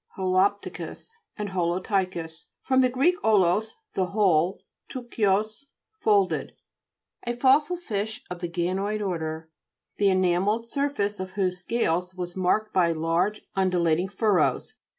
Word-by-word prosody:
HOLO'PTICUS, 190 - -1 0.3
and 210 -2 -3
HOLOPTT'CHIUS 180 -2 -2 0.2
fr. 265 - 0
gr. 260 -1 +6 0.4
0/05, 210 +1 +3 0.2
the 185 -1 0
whole, 185 -3 +2 0.3
ptuchios, 215 -2 -1 0.3
folded. 200 -3 +2 0.7
A 240 - -1
fossil 280 +7 +3
fish 215 - -4
of 180 -1 -7
the 175 -1 -4
ganoid 190 +5 -1
order, 160 -2 -4 0.5
the 200 -1 +3
enamelled 190 +4 +2
surface 255 -7 -1
of 185 0 -5
whose 185 -2 -1
scales 180 -3 -1
was 175 -1 -5
marked 200 +4 +1
by 175 -3 +3
large 165 +6 0
undulating 180 -2 +2
furrows. 200 -1 +1
190 Hz, 115 wpm, -26 LUFS, 180-215 Hz, 0.7 s, gr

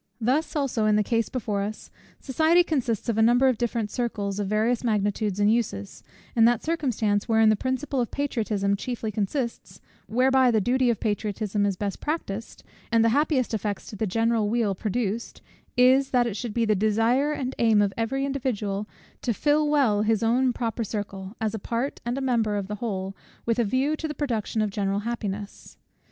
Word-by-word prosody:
Thus 265 +9 0
also 260 -7 0
in 210 - +4
the 210 - +3
case 230 +2 0
before 210 -5 -2
us: 210 +2 -6 0.3
society 320 +6 +3
consists 250 - -1
of 225 -2 0
a - - +5
number 245 +4 +5
of 255 -4 +1
different 230 -3 -1
circles 210 -5 -2
of 205 - -1
various 220 +4 +1
magnitudes 205 -2 0
and 205 +1 +4
uses; 100 - -3 0.3
and 230 -1 +6
that 240 -1 +1
circumstance, 235 -10 0
wherein 225 -1 +5
the 215 - +4
principle 260 +3 -2
of 235 - -2
patriotism 215 -8 -1
chiefly 225 +1 -4
consists, 230 +4 -3 0.3
whereby 260 +2 +3
the 225 -2 +3
duty 250 +4 +2
of 230 - 0
patriotism 205 -1 -1
is 195 -2 -2
best 200 0 -3
practised, 230 -9 -4 0.3
and 230 -1 +4
the - - +5
happiest 275 -1 +1
effects 210 -2 -2
to - - -7
the 215 +1 -1
general 225 +1 +1
weal 225 -3 +1
produced, 220 +2 -3 0.4
is, 260 +2 +5
that 245 -2 +3
it 230 -4 -3
should 220 0 -5
be 235 -1 +2
the 215 - +3
desire 225 +8 +2
and 265 -3 -3
aim 225 -3 +4
of 200 -1 +2
every 270 +4 -1
individual 215 -7 -2 0.3
to 235 -3 -1
fill 300 +3 +2
well 260 -9 +3
his 220 0 +1
own 250 +3 +3
proper 230 -1 -2
circle, 200 -1 -5
as 220 -1 -1
a 220 - -3
part 235 +7 -3
and 240 +3 -2
member 230 -5 +1
of 200 -2 -2
the 210 +1 -5
whole, 195 -4 -3 0.3
with 230 0 +1
a - - +4
view 260 +8 +1
to 315 - -4
the 300 - -5
production 230 -6 -1
of 210 - -2
general 200 0 -1
happiness. 210 -3 -5
225 Hz, 190 wpm, -25 LUFS, 210-255 Hz, 0.4 s, and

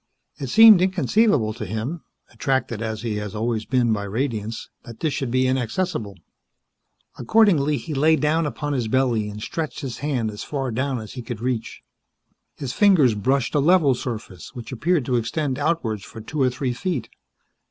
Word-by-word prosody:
It 135 - -4
seemed 220 - +8
inconceivable 185 - +2
to 115 0 -7
him 115 +10 -4 0.3
attracted 130 -5 -1
as 110 -1 -4
he 110 -3 -2
had 105 0 -5
always 110 0 -1
been 120 -3 +2
by 100 -1 -2
radiance 110 0 -3 0.2
that 115 -1 -11
this 155 -3 -1
should 135 - -2
be 130 +2 +2
inaccessible. 130 - -2 1.0
Accordingly, 150 - +3
he 160 - -6
lay 155 +3 +4
down 155 +1 +1
upon 145 +1 -3
his 125 -5 -1
belly 120 -3 +1
and 105 0 -8
stretched 155 +1 -4
his 130 -4 -5
hand 130 -7 -1
as 105 - -7
far 135 -4 -3
down 130 +2 -1
as 110 -2 -9
he 125 - -6
could 120 -1 -6
reach. 120 -1 -3 0.7
His 130 -3 -5
fingers 180 - +5
brushed 125 +5 0
a 150 - +3
level 155 -2 +4
surface 110 - -7
which 120 0 -8
appeared 145 +3 0
to 125 -1 +1
extend 130 +4 -2
outwards 140 -10 -1
for 110 - -10
two 140 +7 -4
or 130 - +4
three 125 0 -2
feet. 165 - -3
130 Hz, 175 wpm, -23 LUFS, 115-150 Hz, 1.0 s, seemed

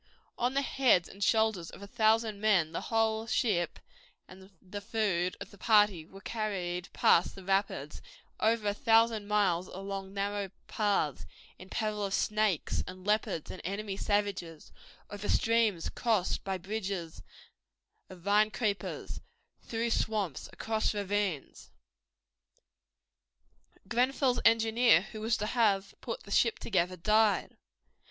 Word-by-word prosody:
On 250 +2 -1
the 275 - +2
heads 250 -11 +3
and 200 +1 -6
shoulders 220 -6 +2
of 200 - -11
a - - -8
thousand 220 -1 +1
men 190 -7 +3
the - - -3
whole 225 0 +1
ship 195 -8 0 0.5
and 190 +1 -14
the 200 +2 -8
food 200 -5 -1
of 200 - -8
the 200 - -16
party 210 -7 +3
were 195 +2 -13
carried 190 -5 -3
past 170 - +3
the 195 - -10
rapids, 195 -7 -1 0.4
over 220 -1 +1
a 205 - +2
thousand 225 -1 +3
miles 190 -4 +1
along 195 0 -6
narrow 200 0 -2 0.2
paths, 200 - 0 0.3
in 185 - -12
peril 215 -1 -2
of 195 -1 0
snakes 215 -6 0
and 185 0 -9
leopards 210 -6 0
and 185 - -9
enemy 200 +2 -4
savages, 200 -6 -2 0.4
over 205 0 -5
streams 225 -6 +2
crossed 220 -6 0
by 190 -1 -2
bridges 190 -3 -5 0.9
of 185 -2 -12
vine 205 +3 +3
creepers, 210 -3 -3 0.4
through 230 0 -2
swamps, 205 - -1
across 220 -1 -1
ravines. 200 -6 -2 2.2
Grenfell's 250 +2 +1
engineer, 225 -3 +5
who 215 - -7
was 220 +1 +1
to 210 - -2
have 205 -4 +1
put 230 - -5
the 200 - -12
ship 230 +2 +3
together, 185 -3 -1
died. 215 +4 +2
205 Hz, 130 wpm, -31 LUFS, 190-220 Hz, 2.2 s, engineer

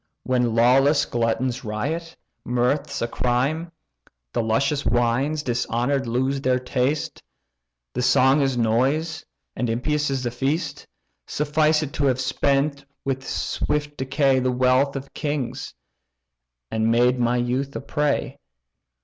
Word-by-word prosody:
When 125 -3 +1
lawless 135 +5 +4
gluttons 120 +2 -1
riot, 150 +10 -3 0.3
mirth's 125 +2 0
a - - 0
crime; 135 +8 -1 0.6
The - - +1
luscious 135 +6 +1
wines, 120 +6 +1
dishonour'd, 125 +2 0
lose 130 +3 0
their 130 -1 +2
taste; 130 +3 -1 0.7
The - - -1
song 130 +3 +4
is 135 -2 +1
noise, 135 +8 +1 0.3
and 125 - -1
impious 150 +6 0
is 135 -2 -2
the 120 - -1
feast. 140 +4 -2 0.4
Suffice 150 +1 +2
it 145 - -6
to 145 - 0
have 130 -2 +2
spent 140 +2 0 0.2
with 135 -1 -2
swift 145 +1 -2
decay 135 0 +2
The 130 0 +1
wealth 130 +2 +2
of 135 0 -7
kings, 145 -5 -3 1.0
and 110 0 +1
made 125 +2 +3
my 120 0 +2
youth 130 +3 -1
a - - -2
prey. 145 +1 -1
130 Hz, 130 wpm, -23 LUFS, 120-145 Hz, 1.0 s, lawless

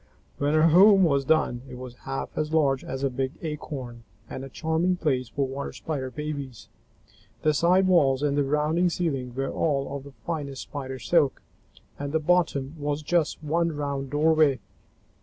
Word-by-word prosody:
When 145 +2 +1
her 155 +1 +5
home 195 +4 +7
was 140 -5 +2
done, 130 -5 +2
it 125 - -8
was 125 -1 -8 0.2
half 135 - -4
as 155 0 -2
large 140 -4 +2
as 135 +1 -5
a 140 - +2
big 130 +2 -2
acorn 135 -6 -6 0.2
and 130 - -6
a 135 - -8
charming 160 +5 0
place 130 -8 -1
for 140 +4 -1
Water 135 +1 -5
Spider 140 -5 -4
babies. 140 -3 -6 0.7
The 155 - +3
side 175 +5 +3
walls 145 -7 +3
and 145 -1 +1
the 145 - +2
rounding 150 +5 +1
ceiling 135 -8 -2
were 135 0 -2
all 140 -3 -1
of 140 - -6
the 140 -1 -12
finest 145 -5 -4
Spider 130 -2 -6
silk, 130 +4 +1 0.6
and 145 +1 -4
the 160 - +3
bottom 155 -4 +1
was 145 +1 -2
just 160 -1 0
one 165 +1 0
round 140 -2 -3
doorway. 150 -1 +3
145 Hz, 175 wpm, -26 LUFS, 135-160 Hz, 0.7 s, home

